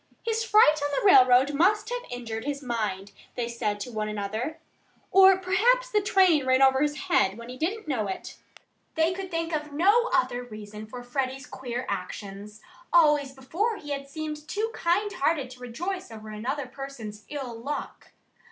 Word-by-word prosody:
"His 455 0 0
fright 420 -10 +5
on 290 - 0
the - - -4
railroad 260 -5 +6
must 415 +9 +2
have - - -2
injured 230 -2 -5
his 285 0 -4
mind," 210 -5 -3 0.2
they 240 -1 -2
said 215 -3 -2
to 245 - -5
one 215 -1 -3
another. 215 +9 -3 0.5
"Or 385 0 +7
perhaps 480 +7 +2
the 420 - +3
train 375 -7 +4
ran 260 0 +4
over 265 0 +5
his 295 0 0
head 220 - +2
when 235 +1 -10
he 250 - -7
didn't 390 +4 -2
know 235 -8 -1
it." 190 - -6 0.6
They 325 +2 +2
could 380 0 -6
think 330 -1 -2
of 300 -1 -4
no 410 +10 +4
other 255 -9 +1
reason 215 -2 -9
for 245 +3 -8
Freddie's 265 +2 -3
queer 250 -3 -5
actions. 205 +1 -6 0.3
Always 295 -5 +4
before 335 - -2
he 290 -5 -8
had 275 -1 -4
seemed 305 0 -6
too 430 +7 -2
kind 400 +4 0
hearted 280 -5 0
to 255 - -12
rejoice 350 +10 -5
over 220 -1 -10
another 250 +7 -3
person's 250 -5 -8
ill 270 -5 -5
luck. 290 +4 -6
280 Hz, 175 wpm, -27 LUFS, 235-350 Hz, 0.6 s, Or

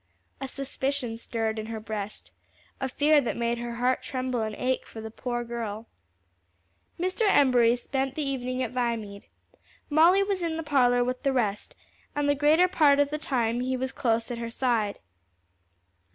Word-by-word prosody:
A 270 - -3
suspicion 270 -2 -2
stirred 225 -1 -3
in 215 - -5
her 225 -1 -4
breast, 215 -1 -6 0.5
a 265 - -2
fear 295 +3 +4
that 245 - -3
made 235 0 0
her 240 0 -4
heart 250 +2 +1
tremble 255 -2 -2
and 215 -1 -3
ache 255 0 -1
for 225 - -9
the 220 0 -7
poor 240 +1 -3
girl. 230 -2 -5 1.1
Mr. 370 +5 -2
Embury 245 -7 +5
spent 270 +2 -2
the 300 -3 -2
evening 255 -1 -2
at 235 - -3
Viamede. 230 -5 -3 0.6
Molly 340 +6 +6
was 395 -2 -1
in 330 -2 -1
the 325 - -3
parlor 250 -5 +3
with 250 +1 -3
the 275 - +1
rest, 215 -6 -1 0.4
and 290 0 0
the 285 - +4
greater 300 +5 +4
part 300 -6 +4
of 285 0 +2
the 300 - -2
time 240 -5 0
he 255 +1 -1
was 260 +1 -2
close 230 -1 0
at 235 - -4
her 230 0 -4
side. 230 -4 0
250 Hz, 175 wpm, -27 LUFS, 230-280 Hz, 1.1 s, Molly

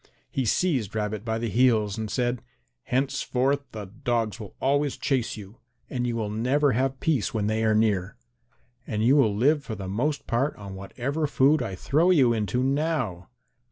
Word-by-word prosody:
He 135 - -1
seized 125 - 0
Rabbit 105 -1 -2
by 110 -1 -1
the 115 +1 -2
heels 110 -2 +2
and 110 -1 -4
said, 120 +2 -1 0.4
"Henceforth 135 +1 0
the 105 -2 -6
dogs 115 +2 -2
will 105 -3 -9
always 140 +1 +1
chase 130 -5 -1
you, 105 +2 -11 0.3
and 125 -2 -1
you 120 - -1
will 110 -3 -2
never 130 +6 +2
have 130 +2 0
peace 135 -9 0
when 105 -2 0
they 110 +1 0
are 110 -1 +3
near. 105 - +1 0.7
And 105 0 -1
you 130 +5 +5
will 110 -8 +3
live 140 +7 +3
for 110 - -5
the 95 -2 -6
most 135 +10 -1
part 130 +5 0
on 100 -2 -9
whatever 130 +11 -3
food 145 +2 +3
I 95 - -3
throw 155 - +2
you 135 -10 +5
into 115 +3 0
now." 135 - -1
120 Hz, 180 wpm, -26 LUFS, 105-135 Hz, 0.7 s, you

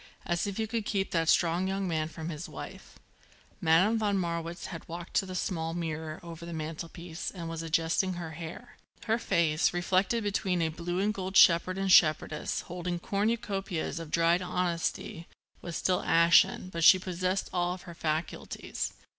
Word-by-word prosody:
As 175 +2 0
if 200 - -4
you 220 - 0
could 225 0 -2
keep 195 -2 -1
that 165 -1 +1
strong 175 +2 +3
young 195 0 -1
man 160 -2 -1
from 160 0 -7
his 155 +1 -6
wife." - - -9 0.6
Madame 185 +7 +4
von 205 -2 +1
Marwitz 170 -1 -3
had 165 - -8
walked 170 +1 -7
to 195 - +1
the 185 - -6
small 165 -3 -2
mirror 160 -2 -4
over 170 -1 -9
the 170 0 -6
mantelpiece 165 +2 -5
and 170 -3 -7
was 165 0 -4
adjusting 165 +3 +1
her 170 -2 -6
hair. 165 +9 -9 0.3
Her 225 +1 +1
face, 165 -4 +2
reflected 190 +6 +1
between 190 -4 0
a 160 - +1
blue 175 +2 -4
and 210 +2 +1
gold 190 -1 -2
shepherd 185 +2 +6
and 195 -1 0
shepherdess 155 -2 +4
holding 175 0 -4
cornucopias 195 -4 -2
of 165 -2 -7
dried 170 +2 +3
honesty, 175 -2 -2 0.3
was 170 -2 -6
still 185 +2 +1
ashen, 170 +2 +4
but 170 -2 -3
she 185 - +9
possessed 185 +1 -2
all 175 0 0
her 175 -1 -11
faculties. 160 0 -3
175 Hz, 170 wpm, -29 LUFS, 165-190 Hz, 0.6 s, she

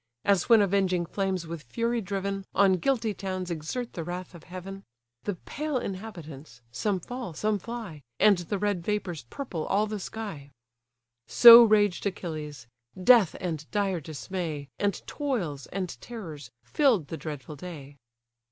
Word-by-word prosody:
As 200 +1 +2
when 225 -3 +7
avenging 185 -3 +1
flames 190 -1 -2
with 165 -1 -6
fury 230 - -1
driven 195 0 -3
On 195 -1 +5
guilty 225 +3 0
towns 185 -2 -4
exert 170 +10 -4
the 165 - -4
wrath 180 +3 -6
of 170 - -13
heaven; 190 +2 -8 0.4
The 205 - -1
pale 295 - -3
inhabitants, 165 - -7
some 195 - -1
fall, 245 -2 -6
some 210 +3 0
fly; 215 -8 -7 0.2
And 205 -4 +5
the 180 +4 -3
red 200 -3 -1
vapours 180 - -3
purple 185 - -5
all 210 +2 +2
the 215 -1 -4
sky: 195 -9 -7 0.8
So 235 - +11
raged 210 -4 +3
Achilles: 155 - -5 0.3
death 215 -2 +6
and 160 -4 -4
dire 195 -4 0
dismay, 155 -1 -5
And 205 -1 -1
toils, 195 - -3
and 185 -2 -4
terrors, 160 - -8
fill'd 235 - +2
the 165 - -4
dreadful 150 -1 -7
day. 145 -3 -9
185 Hz, 145 wpm, -28 LUFS, 160-210 Hz, 0.8 s, So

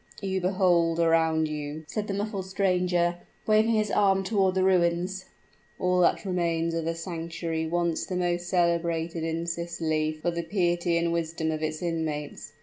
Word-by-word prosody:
"You 190 -1 -1
behold 175 -3 +2
around 160 -1 +3
you," 150 0 -5
said 210 +3 -3
the 195 - -2
muffled 200 -2 -3
stranger, 180 -2 +1 0.3
waving 220 +1 +4
his 215 -2 +1
arm 195 -2 +3
toward 190 -2 +1
the 190 - +2
ruins, 185 +1 +1 0.5
"all 180 0 +1
that 180 +3 +3
remains 170 -3 0
of 165 -1 -2
a 165 - -1
sanctuary 165 -1 -4
once 170 0 -1
the 185 - -3
most 175 -1 -1
celebrated 170 -2 0
in 165 +1 -2
Sicily 165 -2 -1
for 175 - 0
the 170 0 -2
piety 175 -1 0
and 170 0 0
wisdom 160 -1 -1
of 155 0 -3
its 155 +1 -3
inmates. 160 -3 -3
170 Hz, 160 wpm, -27 LUFS, 165-185 Hz, 0.5 s, waving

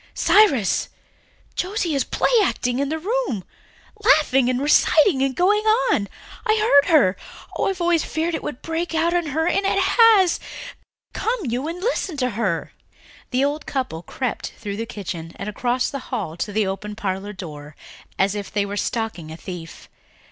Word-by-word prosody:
"Cyrus, 280 - +3 0.6
Josie 365 -3 -2
is 275 - +1
play - - 0
acting 250 -8 -1
in 280 0 0
the 320 - -1
room... 400 - -2 0.6
laughing 285 - +4
and 255 0 0
reciting 295 +1 +4
and 270 -1 0
going 410 +4 +3 0.3
on. 200 - +1 0.4
I 435 -2 +2
heard 285 -10 +4
her. 265 - +5 0.4
Oh, - - 0
I've 380 -2 -2
always 345 -2 +2
feared 330 +2 -2
it - - -2
would 260 - -6
break 330 +1 -3
out 335 +2 +2
in 345 -2 0
her 315 +3 0
and 390 +3 +1
it 390 - +1
has! 390 -2 +5 0.7
Come 475 0 -1
you 250 +2 -2
and 335 +2 -5
listen 380 -6 -2
to 250 -2 0
her." 200 -6 -2 0.6
The 260 +2 +1
old 290 +2 -3
couple 255 - -3
crept 250 +6 -4
through 205 -3 -5
the 230 +1 -4
kitchen 170 -6 -6
and 195 - -6
across 245 +4 -1
the 275 - -4
hall 200 - -3
to 190 +4 -4
the 210 0 +1
open 200 +2 -4
parlour 200 -1 -3
door 150 -6 -9 0.4
as 195 +1 +2
if 205 -1 -5
they 205 -1 0
were 200 0 -5
stalking 220 -8 -3
a 160 - -8
thief. 170 -3 -9
265 Hz, 175 wpm, -22 LUFS, 205-340 Hz, 0.7 s, her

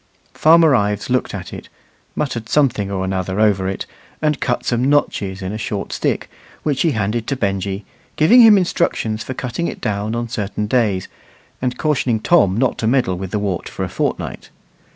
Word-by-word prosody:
Farmer 160 -1 +5
Ives 105 0 0
looked 130 - +1
at - - -7
it, - - -9 0.5
muttered 115 -6 -3
something 120 -9 +2
or 95 -1 -2
another 95 +1 -2
over 100 -3 +2
it, 95 - -3 0.3
and 150 -2 0
cut 120 -2 -1
some 120 +1 +1
notches 100 -9 0
in 95 - -3
a 110 - -5
short 105 -2 -4
stick, - - -1 0.4
which 145 -3 0
he 165 -4 +2
handed 110 +1 -1
to 140 - 0
Benjy, 100 -2 -2 0.3
giving 205 +12 +6
him 220 -3 +8
instructions 140 - 0
for 130 - -6
cutting 125 +9 -3
it - - -6
down 105 +2 -2
on 120 0 -2
certain 105 -2 -3
days, 105 -5 +1 0.5
and 125 -1 -1
cautioning 130 -7 +1
Tom 110 - +3
not 130 0 +1
to 110 - 0
meddle 120 -7 +2
with 95 -1 -5
the 105 - -2
wart 100 -3 -2
for - - -5
a - - -3
fortnight. - - -3
110 Hz, 185 wpm, -19 LUFS, 100-135 Hz, 0.5 s, him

